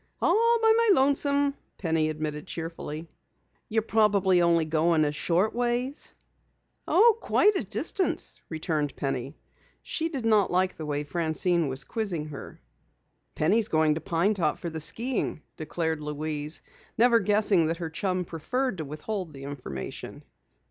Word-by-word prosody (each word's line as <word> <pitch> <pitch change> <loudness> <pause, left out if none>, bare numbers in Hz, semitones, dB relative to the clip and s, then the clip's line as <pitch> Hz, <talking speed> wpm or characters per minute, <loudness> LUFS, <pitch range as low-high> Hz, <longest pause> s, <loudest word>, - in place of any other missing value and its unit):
"All 465 +2 +3
by 445 0 +5
my 465 -1 +3
lonesome," 280 0 +2 0.2
Penny 160 -3 0
admitted 155 -1 -4
cheerfully. 165 -1 -6 0.6
"You're 220 -1 +1
probably 200 -5 +3
only 170 -1 +3
going 160 0 +2
a 145 - 0
short 175 +7 +1
ways?" 245 +3 -1 0.8
"Oh, 455 +3 +5
quite 420 0 +3
a - - 0
distance," 385 -3 -1 0.2
returned 155 -3 -2
Penny. 135 +1 -3 0.5
She 325 0 -2
did 270 -7 -4
not 215 -3 +4
like 185 +1 +1
the 155 - -6
way 145 0 -1
Francine 165 +2 0
was 135 +1 -1
quizzing 175 -9 -3
her. 140 - -9 0.8
"Penny 180 +9 +3
is 220 - 0
going 155 -1 +3
to 155 - -4
Pine 170 +6 +1
Top 170 -7 0
for 170 - -5
the 160 - -5
skiing," 230 - -1
declared 160 0 -2
Louise, 150 0 -3 0.3
never 235 0 +5
guessing 205 -4 +3
that 165 +1 -1
her 165 -2 -5
chum 185 +1 -1
preferred 205 - -2
to 155 - -3
withhold 160 +4 -5
the 135 -1 -10
information. 130 - -7
170 Hz, 150 wpm, -27 LUFS, 155-225 Hz, 0.8 s, by